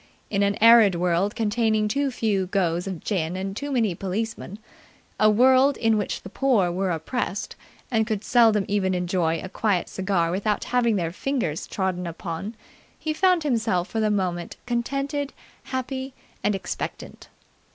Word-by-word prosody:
In 200 -1 +1
an 200 0 +2
arid 225 -4 +7
world 180 +3 +1
containing 220 -1 +1
too 280 +6 0
few 210 -6 0
goes 180 -2 0
of 185 -4 -5
gin 175 -4 -1
and 195 +1 -4
too 285 +5 -4
many 225 -8 +1
policemen, 200 +2 -4 0.6
a 215 - +6
world 260 +5 +5
in 225 -1 +2
which 205 -2 -2
the 190 - -8
poor 225 -11 +2
were 185 +2 -1
oppressed 180 +5 -3 0.4
and 220 -2 +2
could 215 -2 -2
seldom 225 -5 +4
even 190 -2 0
enjoy 175 -2 0
a - - -5
quiet 190 -2 0
cigar 185 -3 0
without 205 +3 -1
having 240 -3 +1
their 170 -4 -1
fingers 225 - -2
trodden 185 -2 -2
upon, 170 +5 -5 0.4
he 310 - -2
found 365 0 +3
himself 220 -9 0
for 225 - -2
the 215 -1 +2
moment 180 -4 -2
contented, 275 +4 -2 0.3
happy, 260 0 -4 0.3
and 210 - +2
expectant. 195 - -6
210 Hz, 155 wpm, -24 LUFS, 185-235 Hz, 0.6 s, arid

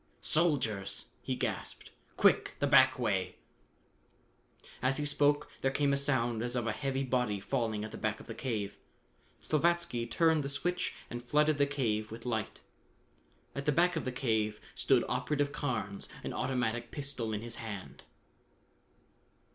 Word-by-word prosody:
"Soldiers!" 130 - +2
he - - -2
gasped. - - -4 0.3
"Quick, - - +4
the - - +1
back 130 -2 +6
way!" 95 -7 0 1.5
As 130 +1 +2
he 150 - -1
spoke 145 0 +2
there 135 - +3
came 140 +1 +2
a - - +3
sound 120 -5 +1
as 120 +1 -2
of 120 -2 0
a 115 - +1
heavy 135 +3 -1
body 125 -6 0
falling 110 -2 -1
at 110 - -5
the - - -7
back 110 0 -1
of - - -11
the 115 - -6
cave. 110 -5 -3 0.7
Slavatsky 165 -6 +1
turned 160 +3 +3
the 140 - -3
switch 175 +6 -1 0.2
and 120 0 -5
flooded 150 +3 +3
the 140 - +4
cave 110 -7 0
with 115 +2 -9
light. 110 -4 -2 0.9
At 140 +1 -5
the - - +5
back 175 +4 +3
of 160 - -2
the 130 - -1
cave 110 -4 0
stood - - +3
Operative 145 -1 0
Carnes, 105 -10 -3
an - - -4
automatic 120 -2 -1
pistol 135 -6 -3
in 105 0 -3
his 120 0 -6
hand. 105 -4 -7
125 Hz, 155 wpm, -32 LUFS, 110-145 Hz, 1.5 s, back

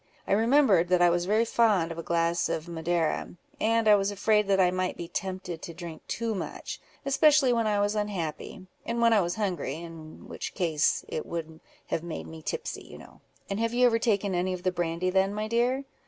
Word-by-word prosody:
I - - -3
remembered, 220 - +4
that 180 0 +3
I 175 - +5
was 175 +1 0
very 215 +3 +3
fond 210 -8 +2
of 165 - -6
a - - -2
glass 170 +1 0
of 160 +1 -3
Madeira, 170 0 -1 0.2
and 225 0 +2
I 210 - +8
was 200 -1 +3
afraid 210 +1 +2
that 195 -1 +3
I 180 -1 +4
might 185 0 -2
be 170 - -6
tempted 185 -1 -5
to 170 - -8
drink 170 -2 -8
too 230 0 -2
much, 195 - -6 0.2
especially 280 -1 +4
when 230 -2 +1
I 205 -1 +1
was 205 +1 +1
unhappy, 190 -5 -4 0.2
and 235 0 -3
when 230 -1 +5
I 210 - +5
was 175 0 -2
hungry, 180 -10 -2
in 165 -1 -10
which - - -6
case 160 -6 +1
it 155 - -4
would 160 -1 -6 0.3
have - - -1
made 170 -1 -6
me 160 0 -10
tipsy, 470 - -4
you - - -12
know." - - -15 0.3
"And 200 +1 -3
have 230 +1 0
you 250 - +3
never 230 -2 +4
taken 205 -4 +1
any 180 +1 0
of 180 -1 -6
the 185 - +2
brandy 175 +1 -1
then, 195 +2 +2
my 215 +1 -2
dear?" 245 +4 +1
190 Hz, 215 wpm, -28 LUFS, 170-220 Hz, 0.3 s, I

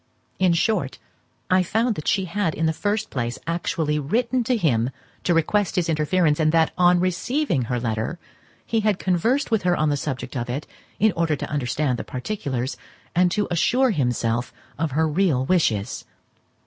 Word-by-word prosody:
In 185 -2 +4
short, 170 - 0 0.5
I 185 0 +5
found 225 +6 +1
that 155 - -7
she 195 -2 +2
had 185 -2 -1
in 160 - 0
the 160 - +2
first 210 +5 -2
place 120 -1 -2
actually 160 -2 -1
written 240 - 0
to 250 +1 +2
him 125 - +1 0.4
to 175 - +3
request 190 +5 +1
his 175 -2 0
interference, 155 0 +2
and 155 -1 +3
that, 165 -1 +3
on 180 0 +4
receiving 185 - 0
her 125 +1 -1
letter, 115 +7 -2 0.5
he 225 - 0
had 210 -3 +1
conversed 225 - +1
with 220 -2 +2
her 180 -1 +2
on 155 0 +2
the 145 - +2
subject 130 -3 -4
of 120 -1 -3
it, 135 +5 -3 0.3
in 220 +1 +4
order 165 -3 0
to - - -6
understand 130 -1 -1
the - - -3
particulars, 130 - -3 0.4
and 180 +1 +4
to 210 - 0
assure 250 +9 +3
himself 120 - 0 0.3
of 165 0 0
her 160 +2 +2
real 150 -5 +1
wishes. 125 - +1
165 Hz, 175 wpm, -23 LUFS, 135-195 Hz, 0.5 s, I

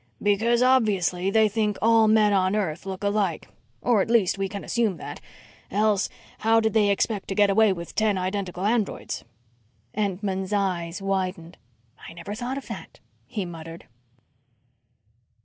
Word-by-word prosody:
"Because, 225 +4 +2
obviously, 195 -8 +2
they 220 +2 +4
think 210 -1 -1
all 225 0 +5
men 215 -1 +4
on 190 0 +2
earth 185 -3 -2
look 190 +1 -5
alike. 205 0 0 0.4
Or, 235 -5 +3
at 225 - -2
least, 225 -6 +3
we 195 -1 -2
can 200 +1 -6
assume 225 -6 0
that. - - -8 0.5
Else 205 0 +1 0.3
how 225 +1 +4
did 220 -1 0
they 210 -2 +4
expect 200 +1 0
to 195 - -3
get 205 0 +4
away 215 +1 +4
with 170 -2 -6
ten 215 -3 +1
identical 185 0 -3
androids?" 220 -1 -1 0.7
Entman's 195 -1 -2
eyes 185 -2 -1
widened. 185 -3 -2 0.5
"I - - -11
never 170 +4 -7
thought 245 +4 -4
of 275 - -7
that," - - -9 0.3
he 205 -5 -3
muttered. 165 -1 -9
200 Hz, 150 wpm, -25 LUFS, 185-220 Hz, 0.7 s, all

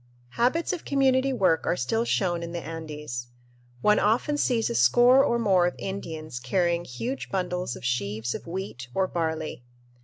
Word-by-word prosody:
Habits 255 - +1
of 350 - -5
community 270 -1 +2
work 190 -10 +2
are - - +1
still 225 - 0
shown 175 -6 0
in 170 0 -6
the 170 - -5
Andes. 150 -6 -6 0.5
One 210 +6 +4
often 240 +8 +2
sees 245 -6 +1
a - - -1
score 240 - +6
or 235 - +2
more 190 -6 +3
of 175 - -3
Indians 160 -8 -5
carrying 170 +6 0
huge 235 - -5
bundles 180 -6 -2
of - - -9
sheaves 115 -1 -1
of - - -7
wheat 170 -8 -5
or 190 - +2
barley. 160 -6 -3
175 Hz, 165 wpm, -26 LUFS, 155-230 Hz, 0.5 s, score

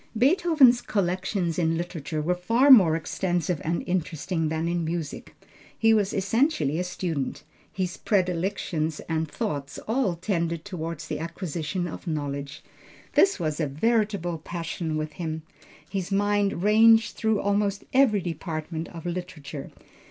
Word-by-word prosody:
Beethoven's 280 - +5
collections 180 -2 -1
in 165 -1 +1
literature 160 -3 -4
were 175 +4 +2
far 230 +10 +3
more 185 -11 +8
extensive 175 0 -1
and 170 +2 -1
interesting 165 -2 -1
than 160 +1 -1
in 170 0 0
music. 165 -2 -4 0.4
He 225 0 +4
was 205 -2 +2
essentially 195 - +1
a - - 0
student. 165 -6 -3 0.3
His 185 -1 -3
predilections 180 -4 -1
and 160 -1 -2
thoughts 145 - -4
all 225 -6 +1
tended 170 -3 -2
toward 165 -5 -5
the 150 - -4
acquisition 170 +1 -3
of 175 - -8
knowledge. 140 -3 -4 0.5
This 390 - +4
was 155 -2 -2
a 155 - +1
veritable 200 - 0
passion 165 -1 -4
with 155 0 -3
him. 160 -2 -4 0.4
His 190 +1 -4
mind 200 -2 +1
ranged 225 +1 +5
through 220 -2 +1
almost 200 0 0
every 255 -7 +4
department 165 -1 -4
of 165 -1 -10
literature. 165 -5 -5
175 Hz, 135 wpm, -26 LUFS, 160-205 Hz, 0.5 s, more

